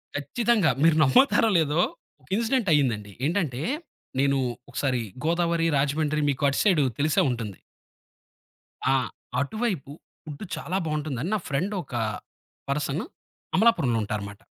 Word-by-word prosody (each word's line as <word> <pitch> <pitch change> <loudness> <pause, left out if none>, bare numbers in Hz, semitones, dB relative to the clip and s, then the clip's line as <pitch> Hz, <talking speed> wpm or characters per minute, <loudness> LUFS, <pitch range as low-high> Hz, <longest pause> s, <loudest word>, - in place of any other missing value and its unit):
ఖచ్చితంగా. 205 - +2
మీరు 165 -1 +5
నమ్ముతారో 225 - +5
లేదో! 155 +2 +2 0.4
ఒక 130 - -25
ఇన్సిడెంట్ 230 -3 +1
అయిందండి. 110 -8 +1
ఏంటంటే, 160 -8 -1 0.6
నేను 140 0 +3 0.3
ఒకసారి 130 -4 -1 0.2
గోదావరి, 170 0 +1
రాజమండ్రి 150 +2 +1
మీకు 140 +2 -5
అటు 140 - -1
సైడు 180 -9 +4 0.2
తెలిసే 150 +1 +3
ఉంటుంది. 115 -6 -4 1.4
ఆ! - - +4 0.4
అటువైపు 180 - -2 0.3
ఫుడ్డు 150 +5 -7
చాలా 180 +4 -3
బావుంటుందని 150 0 -2
నా - - 0
ఫ్రెండొకా 165 - -2 0.7
పర్సన్ 145 +4 -1 0.5
అమలాపురంలో 165 - +3
ఉంటారనమాట. 105 0 -5
150 Hz, 110 wpm, -26 LUFS, 135-175 Hz, 1.4 s, మీరు